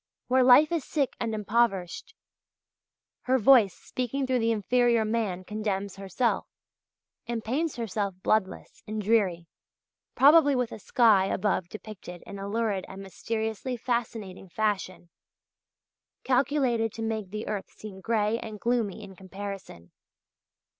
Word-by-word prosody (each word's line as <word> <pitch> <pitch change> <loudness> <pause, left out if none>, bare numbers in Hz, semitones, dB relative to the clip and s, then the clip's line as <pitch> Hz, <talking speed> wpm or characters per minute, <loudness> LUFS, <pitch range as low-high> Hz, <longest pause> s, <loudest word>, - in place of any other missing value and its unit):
Where 260 +1 +4
life 260 +5 +7
is 335 -4 0
sick 280 -2 -1
and 225 -2 -2
impoverished, 210 -4 -1 1.1
her 260 +1 +3
voice 230 -5 +5
speaking 255 +2 -3
through 255 -1 +1
the 230 0 +1
inferior 235 +1 +2
man 215 -5 -1
condemns 200 -1 -3
herself, 195 +5 -1 0.8
and 235 -2 -3
paints 290 +8 -1
herself 205 -4 -3
bloodless 200 -4 -1
and 215 0 -3
dreary, 195 -5 +1 0.7
probably 290 0 +6
with 250 -2 -1
a - - -8
sky 210 -2 +4
above 190 -3 -1
depicted 205 -4 -10
in 200 - -8
a 200 +1 -5
lurid 210 -3 -1
and 195 +1 -9
mysteriously 220 +5 -4
fascinating 220 -6 -3
fashion, 190 -4 -2 1.1
calculated 255 -4 +1
to 225 - -5
make 220 -3 -3
the 215 +2 -5
earth 205 -2 -4
seem 195 -3 -11
gray 220 +1 0
and 215 -3 -8
gloomy 225 -3 -1
in 195 -1 -11
comparison. 190 - -8
220 Hz, 130 wpm, -27 LUFS, 195-240 Hz, 1.1 s, life